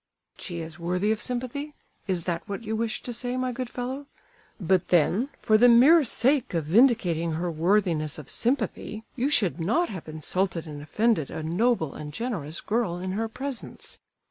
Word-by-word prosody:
"She 170 -2 -4
is 160 +1 -8
worthy 180 +5 0
of 220 - -1
sympathy? 255 +4 -3 0.3
Is 180 -3 -1
that 170 -1 -2
what 200 +3 -4
you 220 0 -2
wished 225 0 -2
to 245 - -3
say, 245 +2 -2
my 255 0 -1
good 250 0 -4
fellow? 260 +4 -5 0.5
But 185 -1 +1
then, 180 - +2
for 215 0 +3
the 245 +1 +7
mere 280 +8 +7
sake 260 -2 +2
of 165 -3 0
vindicating 175 - +3
her 170 +2 -2
worthiness 165 -3 +1
of 150 -4 -9
sympathy, 220 - -1
you 260 +3 0
should 200 - +2
not 230 - +1
have 185 -6 -7
insulted 165 +2 -2
and 150 -2 -8
offended 185 - +1
a 160 - -5
noble 170 - +1
and 150 -1 -7
generous 170 - -4
girl 215 -6 -1
in 185 +1 -4
her 220 +4 -1
presence! 265 +1 -7
205 Hz, 175 wpm, -26 LUFS, 170-245 Hz, 0.5 s, the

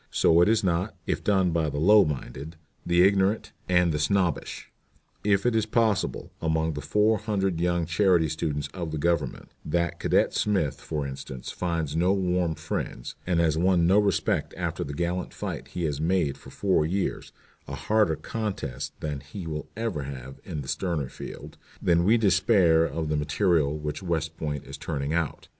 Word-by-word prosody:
So 85 +1 +4
it 90 - +5
is 110 -1 +3
not, 90 +2 0
if - - -2
done 95 -4 +2
by 80 -2 +1
the 75 - -5
low 105 +7 +6
minded, 75 +2 -5 0.3
the 85 0 +4
ignorant, 100 +2 +2 0.2
and 90 -1 +4
the 75 - -1
snobbish. 85 +1 -1 0.5
If 100 0 +2
it 120 - +3
be 110 - +3
possible, 110 -1 0
among 80 0 0
the 75 - -5
four 105 +4 +2
hundred 95 -6 -1
young 85 -1 +1
charity 85 -1 +3
students 75 -1 -2
of 85 -3 -5
the 80 - -3
Government, 75 -3 -1
that 85 +2 -1
Cadet - - +2
Smith, 95 -10 0
for 75 -3 -3
instance, 65 -1 -7
finds 85 -4 -2
no 90 +4 +3
warm 90 -4 0
friends, 75 -5 -4
and 90 -2 +2
has 80 -2 +2
won 90 -1 +3
no 95 +4 +5
respect 105 -1 0
after - - -2
the 70 0 -6
gallant 90 +2 -2
fight - - -5
he 90 - -5
has 75 -2 -1
made 85 -4 +1
for - - -14
four 95 -6 +1
years 95 +5 -2 0.4
a - - -5
harder 105 -7 +2
contest 80 - -5
than 75 -2 -3
he 75 +7 -8
will 75 -2 -5
ever 115 -9 -2
have 65 -1 -8
in 75 - -5
the 65 - -9
sterner 80 -5 -2
field - - -9 0.2
then 85 -1 +3
we 110 +6 +5
despair 95 -5 +4
of 80 -1 -3
the 75 - 0
material 75 0 +1
which 75 +2 -4
West 80 -3 -2
Point 75 -3 -4
is 70 +1 -9
turning 75 -2 -3
out. 85 -3 -2
85 Hz, 180 wpm, -26 LUFS, 75-95 Hz, 0.5 s, low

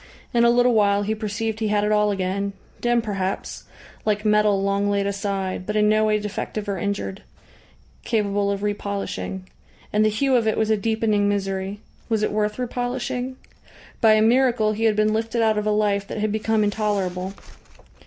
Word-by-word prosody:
In 235 -1 +4
a 235 - +6
little 245 +1 +4
while 205 -2 +3
he 215 +2 -1
perceived 220 0 -3
he 220 - 0
had 210 0 +1
it 210 - +1
all 210 0 +3
again; 200 0 -2 0.3
dim 240 -1 +1
perhaps, 195 -3 -3 0.4
like 210 0 0
metal 210 -1 +3
long 200 +1 +1
laid 200 -1 +1
aside, 195 -2 -3
but 210 - -2
in 210 0 +4
no 215 0 +3
way 215 0 +2
defective 210 0 -4
or 195 -2 -2
injured, 200 0 -3 0.8
capable 205 -3 0
of 200 0 -2
re 210 0 +1
polishing. 200 -2 -5 0.5
And 210 +1 +3
the 215 - +4
hue 260 +5 +1
of 230 -2 +2
it 220 - +1
was 220 0 +1
a - - +5
deepening 215 -1 +1
misery. 195 0 -2 0.3
Was 220 -2 +1
it - - +1
worth 210 0 -1
re 250 - -1
polishing? 250 +1 -3 0.7
By 220 -1 +6
a 215 0 +4
miracle 235 -2 +3
he 225 +2 -1
had 220 -2 +3
been 215 0 +2
lifted 225 +1 0
out 220 -1 +2
of 210 - -3
a - - +3
life 205 -1 +1
that - - -6
had 215 0 0
become 220 0 +1
intolerable.... 195 -3 -1
210 Hz, 195 wpm, -23 LUFS, 200-220 Hz, 0.8 s, a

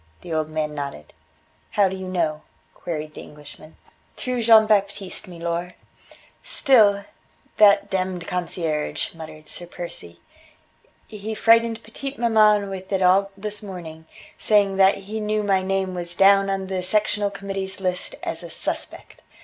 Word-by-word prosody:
The 170 - -6
old 155 -1 -1
man 155 -1 -2
nodded. 140 - -6 0.6
"How 205 -2 +3
do 190 - -4
you 190 0 -6
know?" 165 -4 -1 0.3
queried 155 -3 -5
the - - -9
Englishman. 150 +1 -13 0.4
"Through 250 -1 -2
Jean 225 -1 +7
Baptiste, 200 -2 0
milor." 170 0 -4 0.7
"Still 205 -7 +4 0.5
that 205 -2 +5
demmed 185 -2 -2
concierge," 165 -4 -2
muttered 155 -2 -11
Sir 175 - -7
Percy. 85 - -9 0.9
"He 215 +1 -6
frightened 230 0 +3
petite 270 +5 -7
maman 215 -3 +4
with 190 0 -7
it 190 -1 +1
all 195 +2 +4
this 210 +1 -5
morning, 165 -5 -9 0.3
saying 200 -2 +3
that 195 0 +5
he 215 +2 -4
knew 215 0 -1
my 195 -2 +2
name 190 0 -1
was 175 -1 -4
down 195 +1 +5
on 195 0 -1
the 190 -1 -3
Sectional 205 +1 +1
Committee's 195 -1 -5
list 180 -1 -3
as 165 +1 -3
a 170 - -8
'suspect.' - - -5
190 Hz, 145 wpm, -23 LUFS, 170-205 Hz, 0.9 s, Jean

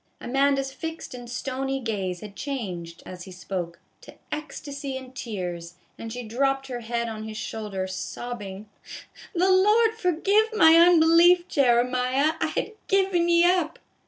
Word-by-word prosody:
Amanda's 270 +1 +1
fixed 325 -1 -7
and 245 -1 -9
stony 270 +2 -3
gaze 195 -7 -3
had 210 -2 -10
changed, 185 - -5
as 180 -1 -9
he 190 - -11
spoke, 180 -2 -5 0.2
to - - -14 0.2
ecstasy 285 -2 -5
and 260 0 -11
tears, 175 -7 -5 0.2
and 225 - -8
she 245 +1 -5
dropped 270 +4 0
her 245 -1 -4
head 235 0 -3
on 220 -1 -6
his 215 -1 -7
shoulder, 210 -4 -4
sobbing, 200 +1 -6 0.4
" - - -19
The 370 +2 +3
Lord 425 +4 +4
forgive 400 +1 +2
my 320 -6 +7
unbelief, 340 +1 +6
Jeremiah. 255 +2 +2
I - - +2
had - - -3 0.2
given 380 -3 +2
ye 340 0 +5
up." 350 -2 +2
260 Hz, 150 wpm, -25 LUFS, 215-330 Hz, 0.4 s, my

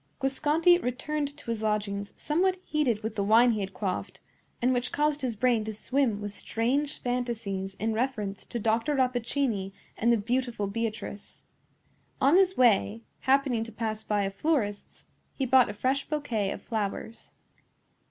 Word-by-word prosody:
Guasconti 305 +6 +3
returned 285 +3 -3
to 235 - -5
his 225 -2 -3
lodgings 205 -2 -1
somewhat 370 +5 +1
heated 250 -8 0
with 220 - -3
the 205 -2 -1
wine 230 +4 +6
he 215 - -1
had 195 -1 -3
quaffed, 195 -2 -4 0.4
and 250 +2 +2
which 250 0 -1
caused 295 0 +1
his 250 -4 -1
brain 235 0 +2
to 220 - -4
swim 240 0 0
with 205 0 -4
strange 265 +8 -1
fantasies 230 -6 -3
in 220 +3 -1
reference 220 -5 -2
to - - -6
Dr. 230 +6 +1
Rappaccini 245 -5 0 0.2
and 235 +2 +2
the 235 - +4
beautiful 240 0 -1
Beatrice. 215 -1 -5 0.8
On 275 +5 +5
his 380 0 +4
way, 230 -2 +3 0.2
happening 265 -4 +2
to 230 - -8
pass 220 -1 -3
by 210 -2 0
a 195 - -1
florist's, 205 -4 -2 0.3
he 270 - -1
bought 255 -2 +5
a - - -4
fresh 265 +5 0
bouquet 245 -10 -1
of - - -6
flowers. 220 +1 -4
235 Hz, 160 wpm, -28 LUFS, 210-270 Hz, 0.8 s, wine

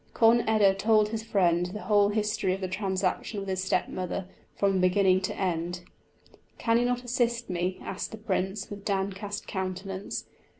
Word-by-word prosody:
Conn 230 +1 +6
eda 210 -3 +5
told 210 +2 +3
his 220 0 -3
friend 180 -5 +2
the 210 +4 -6
whole 205 -1 +4
history 210 -3 0
of 195 - -9
the 185 - -1
transaction 190 +2 -1
with 195 -1 -5
his 185 0 -1
stepmother 185 -1 -1 0.3
from 200 -1 +2
the 190 - +1
beginning 185 0 +4
to 185 - -3
end. 175 -1 -1 0.8
"Can 230 0 +2
you 245 - +2
not 245 0 0
assist 240 -2 0
me?" 180 +1 -1
asked 195 - -4
the 220 - -8
Prince, 195 -1 -2
with 200 -1 -7
downcast 200 0 -2
countenance. 190 +1 -4
195 Hz, 170 wpm, -28 LUFS, 185-215 Hz, 0.8 s, Conn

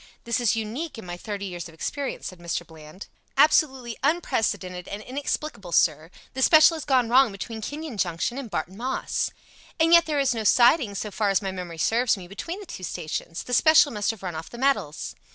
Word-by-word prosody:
"This 235 0 -1
is 235 -2 +2
unique 230 +8 -4
in 225 - -9
my 175 0 -5
thirty 200 +2 -5
years 175 -3 -6
of 165 - -15
experience," 280 - -4
said 185 - -7
Mr. 175 0 -3
Bland. 160 +3 -12 0.3
"Absolutely 270 -5 +3
unprecedented 210 - -1
and 205 +2 -6
inexplicable, 265 - -4
sir. 155 -1 +2 0.2
The 265 - -4
special 310 +4 +7
has 315 -4 -5
gone 255 -3 +3
wrong 255 0 +5
between 220 +3 -6
Kenyon 295 0 -6
Junction 185 +8 -1
and 260 -5 -7
Barton 175 +1 -4
Moss." 255 +3 -2 0.5
"And 330 +1 +4
yet 340 -1 +7
there 300 -2 0
is 275 -2 +2
no 225 -2 -3
siding, 240 0 +4
so 210 +1 -4
far 210 0 0
as 195 +1 +1
my 195 - -2
memory 180 -3 -7
serves 230 +7 +2
me, 180 -2 -10
between 330 - -6
the 410 - -9
two 345 - -9
stations. 165 -1 -5
The 250 - -6
special 315 +2 +6
must 210 -2 -1
have 225 -4 -4
run 180 -2 -4
off 160 0 -7
the 240 - -10
metals." 260 - 0
225 Hz, 205 wpm, -25 LUFS, 185-275 Hz, 0.5 s, special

